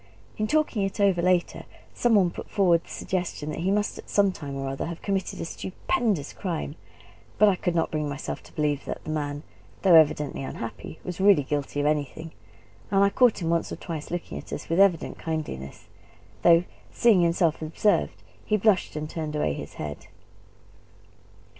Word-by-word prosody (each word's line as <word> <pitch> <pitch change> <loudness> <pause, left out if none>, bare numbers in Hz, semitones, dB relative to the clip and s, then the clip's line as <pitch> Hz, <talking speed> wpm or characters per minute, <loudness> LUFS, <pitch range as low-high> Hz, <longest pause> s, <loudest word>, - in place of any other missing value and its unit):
In 215 - -1
talking 305 -6 +1
it 195 +1 -2
over 195 -4 +3
later, 180 0 +1 0.3
some 240 -2 +2
one 185 -4 +4
put - - -8
forward 175 -4 +3
the - - -20
suggestion 175 -5 -3
that - - -5
he 180 +3 0
must 205 +1 0
at - - -12
some 200 -1 +3
time 145 -6 -7
or 135 0 -3
other 135 +3 -3
have 170 0 -7
committed 195 -2 -2
a - - -3
stupendous 190 - -2
crime; 165 -6 -3 0.6
but 215 - +6
I 200 - +4
could 175 -1 -2
not 165 - +1
bring 150 -1 -1
myself 140 -1 -5
to - - -17
believe 145 -2 -1
that - - -5
the 155 - -5
man, 145 -1 -3 0.4
though 190 -3 +6
evidently 150 -3 +4
unhappy, 135 +3 -6
was 180 0 -5
really 195 -7 +6
guilty 145 +1 -2
of 145 - 0
anything; 150 +2 -1 0.6
and 195 0 +4
I 200 - +4
caught 240 -6 +3
him 165 - 0
once 170 0 0
or - - -3
twice 160 -4 -6
looking 175 0 -4
at - - -12
us - - -6
with 165 +3 +1
evident 195 -5 +3
kindliness, 150 - -5 0.6
though 170 0 +6 0.3
seeing 225 -6 +4
himself 170 -2 +2
observed, 160 +7 0 0.2
he 215 - +1
blushed 205 -5 +2
and 155 0 -3
turned 155 -1 -4
away 115 - 0
his - - -8
head. 75 -1 -6
170 Hz, 185 wpm, -26 LUFS, 150-195 Hz, 0.6 s, but